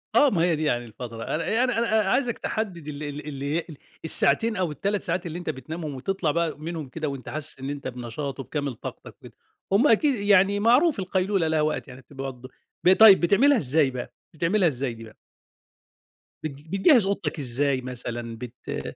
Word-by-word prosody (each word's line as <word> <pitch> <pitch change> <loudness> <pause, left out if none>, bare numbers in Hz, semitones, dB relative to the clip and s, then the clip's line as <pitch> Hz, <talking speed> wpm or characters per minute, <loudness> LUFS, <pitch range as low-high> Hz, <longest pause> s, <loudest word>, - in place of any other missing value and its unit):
آه 290 - +6
ما 175 -7 0
هي 170 -2 +3
دي 155 - -3
يعني 120 -5 0
الفترة، 115 0 -8
أنا 220 +10 0
أنا 250 -2 0
أنا 220 -4 +2
عايزك 245 -1 +1
تحدّد 185 -9 -4
ال 150 0 -6
ال 145 0 -6
اللي 140 +3 -2
ال 160 -4 -9 0.3
الساعتين 225 +7 +3
أو 180 -5 -1
ال3 200 +7 -1
ساعات 175 +1 -2
اللي 170 +1 -5
أنت 175 - -5
بتنامهم 155 +2 -5
وتطَلع 165 +3 -1
بقى 165 -1 -1
منهم 160 -2 -5
كده 155 +2 -4
وأنت 135 -3 -7
حاسس 155 -2 -2
إن 135 +1 -5
أنت 140 -2 -5
بنشاط 130 +3 -5
وبكامل 140 0 -3
طاقتك - - -9
كده، - - -13 0.4
هُم 230 +9 +4
أكيد 265 +4 +4
يعني 200 -1 +3
معروف 250 - +4
القيلولة 185 -1 0
لها 160 -1 +1
وقت 155 0 -1
يعني 125 +1 -11
بتبقى 135 +1 -7
برضو، 130 +1 -13 0.3
ب 185 - +7
طيب 210 -2 +8
بتعملها 240 +11 +4
إزاي 140 - +2
بقى، 125 -1 -6 0.2
بتعملها 175 +4 +2
إزاي 130 -4 -2
دي 115 0 -11
بقى؟ 110 -1 -13 1.3
بت 155 - -2 0.2
بتجهِّز 195 - +4
أوضتك 195 -5 -2
إزاي 135 +1 0
مثلًا 120 -2 -6
بت 125 +1 -7
155 Hz, 185 wpm, -25 LUFS, 135-195 Hz, 1.3 s, طيب